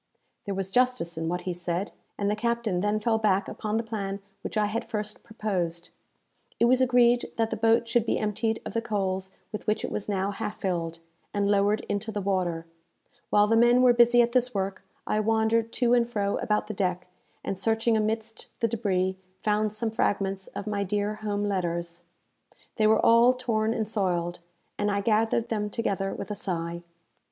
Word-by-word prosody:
There 200 Hz, -2 st, -3 dB
was 190 Hz, 0 st, -3 dB
justice 250 Hz, -7 st, +1 dB
in 160 Hz, 0 st, -3 dB
what 180 Hz, +1 st, -2 dB
he 180 Hz, 0 st, -3 dB
said; 175 Hz, +2 st, -3 dB, 0.3 s
and 200 Hz, -, -1 dB
the 210 Hz, -, +1 dB
captain 235 Hz, -4 st, -1 dB
then 210 Hz, +2 st, +1 dB
fell 220 Hz, +1 st, +1 dB
back 200 Hz, -3 st, +2 dB
upon 215 Hz, 0 st, -3 dB
the 230 Hz, -, 0 dB
plan 200 Hz, -3 st, -4 dB, 0.2 s
which -, -, -5 dB
I 210 Hz, -, +3 dB
had 215 Hz, +3 st, -2 dB
first 210 Hz, -1 st, -5 dB
proposed. 180 Hz, -7 st, -3 dB, 0.7 s
It -, -, +5 dB
was 255 Hz, +2 st, +4 dB
agreed 245 Hz, -1 st, +4 dB
that 225 Hz, -1 st, +1 dB
the -, -, 0 dB
boat 225 Hz, +1 st, +3 dB
should 235 Hz, -1 st, +1 dB
be -, -, +1 dB
emptied 220 Hz, +1 st, -1 dB
of -, -, -5 dB
the 230 Hz, -, 0 dB
coals 190 Hz, -4 st, -2 dB, 0.2 s
with 210 Hz, -, -6 dB
which 215 Hz, -, +1 dB
it -, -, -6 dB
was 210 Hz, -, -3 dB
now 195 Hz, 0 st, 0 dB
half 210 Hz, +1 st, -5 dB
filled, 170 Hz, -4 st, -2 dB, 0.4 s
and 200 Hz, 0 st, +2 dB
lowered 205 Hz, +1 st, +2 dB
into 205 Hz, +2 st, -2 dB
the 210 Hz, -, -3 dB
water. 180 Hz, -4 st, -1 dB, 0.6 s
While 205 Hz, 0 st, +5 dB
the 225 Hz, +2 st, +2 dB
men 240 Hz, +2 st, +5 dB
were 250 Hz, -1 st, +7 dB
busy 240 Hz, 0 st, +6 dB
at 235 Hz, -, -1 dB
this 250 Hz, -1 st, +1 dB
work, 195 Hz, 0 st, -2 dB, 0.2 s
I 215 Hz, -, 0 dB
wandered 225 Hz, +1 st, +2 dB
to 245 Hz, -1 st, +2 dB
and 240 Hz, -1 st, +3 dB
fro 200 Hz, -4 st, 0 dB
about 210 Hz, 0 st, 0 dB
the 215 Hz, -, -5 dB
deck, 180 Hz, -2 st, -1 dB, 0.4 s
and, -, -, -2 dB
searching 225 Hz, +3 st, +1 dB
amidst 220 Hz, +1 st, -2 dB
the 230 Hz, -, +2 dB
débris, 190 Hz, -5 st, 0 dB, 0.3 s
found 210 Hz, 0 st, +1 dB
some 220 Hz, +1 st, -1 dB
fragments 195 Hz, -3 st, -1 dB
of -, -, -7 dB
my 205 Hz, -1 st, -1 dB
dear 205 Hz, +2 st, -1 dB
home 205 Hz, -1 st, -2 dB
letters. 170 Hz, -3 st, -2 dB, 0.8 s
They 215 Hz, -2 st, +4 dB
were 220 Hz, 0 st, +4 dB
all 235 Hz, +2 st, +6 dB
torn 225 Hz, -3 st, 0 dB
and 220 Hz, -2 st, -1 dB
soiled, 175 Hz, -5 st, -1 dB, 0.4 s
and 205 Hz, 0 st, +1 dB
I 200 Hz, 0 st, 0 dB
gathered 225 Hz, +2 st, +1 dB
them 210 Hz, -2 st, -1 dB
together 200 Hz, -3 st, -1 dB
with -, -, -6 dB
a -, -, 0 dB
sigh. 170 Hz, -5 st, -3 dB
210 Hz, 195 wpm, -27 LUFS, 195-225 Hz, 0.8 s, were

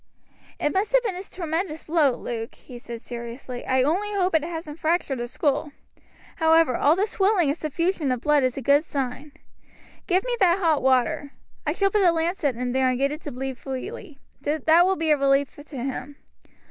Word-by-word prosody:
"It 295 Hz, -, 0 dB
must 400 Hz, +5 st, 0 dB
have -, -, +5 dB
been 430 Hz, -5 st, -1 dB
a 360 Hz, -, -5 dB
tremendous 335 Hz, -3 st, -4 dB
blow, 305 Hz, -5 st, +3 dB
Luke," 230 Hz, -1 st, -5 dB
he 245 Hz, -2 st, -12 dB
said 235 Hz, -1 st, -8 dB
seriously. 240 Hz, +1 st, -7 dB
"I, 260 Hz, 0 st, +3 dB
only 375 Hz, +9 st, 0 dB
hope 370 Hz, -2 st, +1 dB
it 320 Hz, -2 st, +3 dB
hasn't 325 Hz, -2 st, -6 dB
fractured 315 Hz, -5 st, 0 dB
the 240 Hz, -, -3 dB
skull. 290 Hz, +3 st, -1 dB, 0.6 s
However, 320 Hz, -5 st, +4 dB
all 300 Hz, +3 st, +4 dB
this 405 Hz, +3 st, 0 dB
swelling 385 Hz, -6 st, +2 dB
and 285 Hz, -, +1 dB
suffusion 320 Hz, -1 st, -1 dB
of 250 Hz, -2 st, -2 dB
blood 295 Hz, 0 st, +3 dB
is 255 Hz, 0 st, 0 dB
a 270 Hz, -, -4 dB
good 285 Hz, +4 st, +4 dB
sign. 275 Hz, -1 st, -4 dB, 0.8 s
Give 370 Hz, +1 st, +2 dB
me -, -, -1 dB
that 360 Hz, -2 st, +4 dB
hot 325 Hz, -6 st, +2 dB
water. 265 Hz, +3 st, +1 dB, 0.3 s
I -, -, +3 dB
shall 395 Hz, 0 st, +1 dB
put 420 Hz, -, +2 dB
a 360 Hz, -3 st, +5 dB
lancet 325 Hz, -5 st, 0 dB
in 245 Hz, +1 st, -3 dB
here 260 Hz, 0 st, +3 dB
and 255 Hz, -, 0 dB
get 275 Hz, +2 st, +1 dB
it 305 Hz, +2 st, -6 dB
to 295 Hz, -, -6 dB
bleed 265 Hz, 0 st, -5 dB
freely. 300 Hz, -, -7 dB, 0.2 s
That 315 Hz, +4 st, +3 dB
will 380 Hz, -, +2 dB
be 325 Hz, -3 st, 0 dB
a 300 Hz, -, +5 dB
relief 275 Hz, 0 st, +2 dB
to 290 Hz, -1 st, -10 dB
him." 265 Hz, +2 st, -4 dB
300 Hz, 200 wpm, -24 LUFS, 265-345 Hz, 0.8 s, have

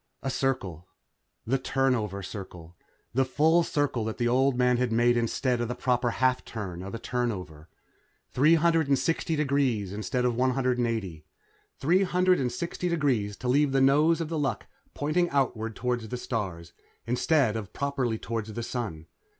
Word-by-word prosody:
A 135 Hz, -, -1 dB
circle. 95 Hz, -, -2 dB, 0.6 s
The 135 Hz, +4 st, +1 dB
turnover 125 Hz, -7 st, 0 dB
circle. 90 Hz, -4 st, -9 dB, 0.4 s
The 135 Hz, +3 st, +3 dB
full 155 Hz, +6 st, +3 dB
circle 145 Hz, -7 st, -1 dB
that 110 Hz, -, -4 dB
the 120 Hz, -, +1 dB
old 130 Hz, +1 st, +2 dB
man 125 Hz, -1 st, +3 dB
had 125 Hz, -1 st, 0 dB
made 120 Hz, +1 st, +3 dB
instead 120 Hz, +1 st, 0 dB
of 120 Hz, -, -1 dB
the 125 Hz, -, -3 dB
proper 125 Hz, -1 st, +1 dB
half 130 Hz, +2 st, +1 dB
turn 95 Hz, -6 st, -6 dB
of 100 Hz, +4 st, -6 dB
a -, -, -3 dB
turnover. 95 Hz, -11 st, -4 dB, 0.6 s
Three 150 Hz, +6 st, +5 dB
hundred 160 Hz, -4 st, +3 dB
sixty 165 Hz, +1 st, 0 dB
degrees 135 Hz, -9 st, 0 dB
instead 125 Hz, +4 st, -1 dB
of 125 Hz, -, +2 dB
one 130 Hz, +1 st, +2 dB
hundred 125 Hz, -2 st, +1 dB
eighty. 100 Hz, -10 st, -2 dB, 0.5 s
Three 175 Hz, +7 st, +3 dB
hundred 180 Hz, -8 st, +2 dB
sixty 170 Hz, +6 st, -3 dB
degrees 125 Hz, -12 st, 0 dB
to 125 Hz, -, -5 dB
leave 140 Hz, +2 st, +3 dB
the 135 Hz, -, +3 dB
nose 150 Hz, +5 st, +4 dB
of 160 Hz, -, -3 dB
The 165 Hz, -2 st, -2 dB
Luck 135 Hz, -7 st, -1 dB, 0.3 s
pointing 165 Hz, +4 st, +1 dB
outward 115 Hz, -5 st, -1 dB
toward 125 Hz, -1 st, -1 dB
the 110 Hz, +3 st, -5 dB
stars, 90 Hz, -9 st, -4 dB, 0.3 s
instead 125 Hz, 0 st, +2 dB
of 105 Hz, -2 st, -5 dB
properly 135 Hz, -5 st, -1 dB
toward 115 Hz, -1 st, -4 dB
the 110 Hz, +2 st, -5 dB
Sun. 110 Hz, -11 st, -4 dB
125 Hz, 165 wpm, -27 LUFS, 110-140 Hz, 0.6 s, Three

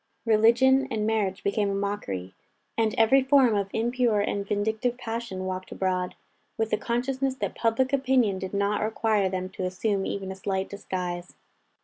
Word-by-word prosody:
Religion 240 Hz, +5 st, +4 dB
and 220 Hz, -4 st, -1 dB
marriage 210 Hz, -4 st, 0 dB
became 200 Hz, 0 st, +1 dB
a 195 Hz, -, -1 dB
mockery, 100 Hz, -, -3 dB, 0.4 s
and 220 Hz, -2 st, +1 dB
every 225 Hz, +4 st, +5 dB
form 265 Hz, -3 st, +4 dB
of 200 Hz, -1 st, 0 dB
impure 235 Hz, -1 st, +1 dB
and 200 Hz, 0 st, -1 dB
vindictive 220 Hz, +4 st, 0 dB
passion 225 Hz, -6 st, -4 dB
walked 185 Hz, 0 st, -4 dB
abroad, 185 Hz, -1 st, -1 dB, 0.4 s
with 225 Hz, 0 st, -1 dB
the -, -, +4 dB
consciousness 260 Hz, +4 st, -1 dB
that 260 Hz, -, -3 dB
public 245 Hz, +4 st, +1 dB
opinion 255 Hz, -7 st, +2 dB
did 190 Hz, -1 st, -5 dB
not 200 Hz, +1 st, +1 dB
require 215 Hz, -2 st, +1 dB
them 185 Hz, 0 st, -3 dB
to 185 Hz, 0 st, -6 dB
assume 195 Hz, +2 st, -1 dB
even 190 Hz, -1 st, -3 dB
a -, -, -6 dB
slight 190 Hz, 0 st, -2 dB
disguise. 180 Hz, -3 st, -5 dB
210 Hz, 160 wpm, -26 LUFS, 190-235 Hz, 0.4 s, every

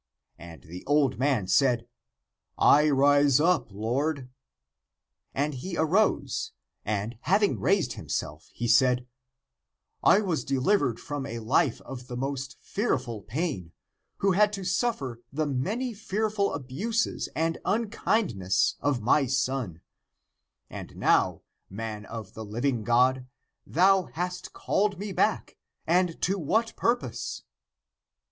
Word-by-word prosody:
And 85 Hz, -2 st, -11 dB
the 90 Hz, +3 st, -9 dB
old 145 Hz, -3 st, +2 dB
man 130 Hz, -7 st, +1 dB
said, 120 Hz, +2 st, +2 dB, 0.4 s
" -, -, -57 dB
I 150 Hz, +1 st, +5 dB
rise 145 Hz, 0 st, +4 dB
up, 165 Hz, -, +2 dB
lord." 125 Hz, +6 st, -2 dB, 1.0 s
And 145 Hz, +2 st, -1 dB
he 170 Hz, +7 st, -5 dB
arose, 160 Hz, -4 st, +1 dB, 0.3 s
and, 105 Hz, +2 st, -3 dB
having 200 Hz, +6 st, +2 dB
raised 195 Hz, -2 st, +1 dB
himself, 75 Hz, +1 st, -5 dB
he 120 Hz, -, -3 dB
said, 125 Hz, +1 st, +4 dB, 0.5 s
" -, -, -53 dB
I 205 Hz, -, +4 dB
was 180 Hz, -6 st, -1 dB
deliv 140 Hz, +10 st, +2 dB
ered 125 Hz, -5 st, -1 dB
from 145 Hz, -2 st, -5 dB
a 115 Hz, -, -5 dB
life 115 Hz, +2 st, +1 dB
of 125 Hz, -1 st, -9 dB
the 125 Hz, -1 st, -6 dB
most 135 Hz, -1 st, -4 dB
fearful 130 Hz, -, -2 dB
pain, 110 Hz, -, -4 dB, 0.4 s
who 195 Hz, -, +2 dB
had 205 Hz, +3 st, +4 dB
to 195 Hz, -2 st, -4 dB
suffer 140 Hz, -, -1 dB
the 155 Hz, +3 st, -1 dB
many 205 Hz, -, -2 dB
fearful 210 Hz, -1 st, -1 dB
abuses 175 Hz, -, -2 dB
and 165 Hz, +1 st, 0 dB
unkindness 205 Hz, -, 0 dB
of 130 Hz, -3 st, 0 dB
my 135 Hz, +4 st, +3 dB
son; 125 Hz, -9 st, -1 dB, 0.9 s
and -, -, -9 dB
now, -, -, +2 dB, 0.3 s
man 105 Hz, 0 st, -6 dB
of 110 Hz, -4 st, -8 dB
the 110 Hz, -, -7 dB
living 115 Hz, +3 st, -1 dB
God, 125 Hz, +3 st, +2 dB, 0.4 s
thou 190 Hz, +2 st, +4 dB
hast 180 Hz, +3 st, -5 dB
called 205 Hz, -1 st, 0 dB
me 200 Hz, +2 st, -5 dB
back -, -, 0 dB
— -, -, -60 dB
(and) 175 Hz, 0 st, +1 dB
to 195 Hz, +2 st, +1 dB
what 220 Hz, +9 st, 0 dB
purpose?" 125 Hz, -, -2 dB
140 Hz, 130 wpm, -27 LUFS, 120-185 Hz, 1.0 s, I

